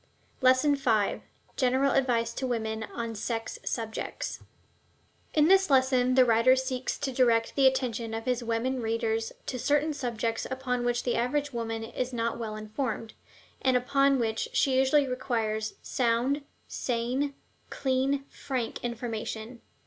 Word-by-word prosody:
LESSON 260 +3 +5
V 225 -7 +1 0.4
GENERAL 265 +1 +3
ADVICE 235 -3 +1
TO 260 - -3
WOMEN 220 -2 -2
ON 230 0 -5
SEX 225 +1 -4
SUBJECTS 225 -2 -4 1.0
In 305 0 +5
this 385 0 +5
lesson 260 -2 +3
the 260 -1 +7
writer 230 +2 +5
seeks 260 -1 -2
to 280 -2 -2
direct 235 -3 +2
the 275 -1 +6
attention 240 -4 -1
of 225 0 -5
his 250 -1 0
women 235 +3 -1
readers 225 0 -1
to 255 - -4
certain 295 +4 +2
subjects 230 -4 -2
upon 255 -2 -2
which 240 0 0
the 245 - 0
average 285 +4 0
woman 225 -1 -3
is 245 +2 -4
not 230 0 -1
well 220 -2 -4
informed, 220 +1 -4 0.5
and 260 -1 +3
upon 275 +2 +3
which 225 -2 -1
she 265 -2 +2
usually 270 +2 +4
requires 225 -4 -2
sound, 250 +4 +1 0.3
sane, 255 +4 -1 0.3
clean, 270 +1 0
frank 255 -4 -4
information. 235 -1 -4
245 Hz, 140 wpm, -28 LUFS, 230-265 Hz, 1.0 s, the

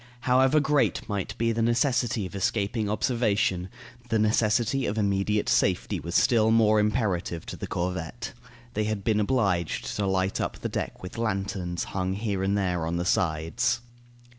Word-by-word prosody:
However 130 +4 +4
great 150 -1 +1
might 100 -3 -3
be 115 0 +1
the 115 0 -1
necessity 120 -2 +1
of 90 - -8
escaping 100 +2 -1
observation, 105 -5 0 0.4
the 110 - +2
necessity 110 +4 +2
of 105 - -2
immediate 100 0 +1
safety 95 -2 +1
was 85 +2 -6
still 115 -4 +4
more 110 -1 +4
imperative 105 -6 0
to - - -6
the - - -6
corvette. 90 +6 -4 0.4
They 105 -1 0
had 105 -2 -2
been 110 -1 +2
obliged 100 -7 0
to 100 -1 0
light 95 0 0
up - - -3
the - - -4
deck - - -4
with 90 +5 -7
lanterns 95 -5 -2
hung 95 0 -2
here 100 -1 -2
and 100 +1 +1
there 90 -4 0
on 85 +1 -1
the 90 - -2
sides. 90 +10 +1
105 Hz, 165 wpm, -27 LUFS, 95-115 Hz, 0.4 s, However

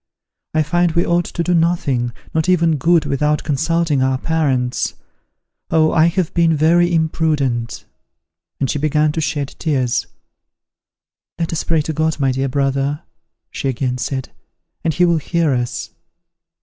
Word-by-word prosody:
I 155 - +3
find 175 +2 +1
we 170 +1 +1
ought 175 0 +1
to 170 - -3
do 180 - +1
nothing, 160 -8 +1 0.2
not 160 +2 0
even 165 -3 +3
good, 165 +4 +3
without 150 +2 0
consulting 160 0 0
our 130 0 +1
parents. 130 -5 -1 0.7
Oh, 155 -1 +3
I 160 0 +4
have 175 -1 -1
been 165 -2 +3
very 170 +3 +3
imprudent!" 155 -7 0 0.7
and 135 - +1
she 145 - -2
began 150 +1 +2
to 160 - -2
shed 145 -1 -2
tears. 130 -7 0 1.3
"Let 165 0 -2
us 165 - -1
pray 160 -2 +1
to 160 - -3
God, 160 0 0
my 135 -2 +2
dear 135 +1 -1
brother," 140 +2 -1 0.5
she 135 - -2
again 125 0 -2
said, 130 0 -3 0.5
"and 165 - +1
he 180 - +4
will 170 -1 +3
hear 160 -1 0
us." 120 -1 -3
155 Hz, 150 wpm, -18 LUFS, 135-165 Hz, 1.3 s, I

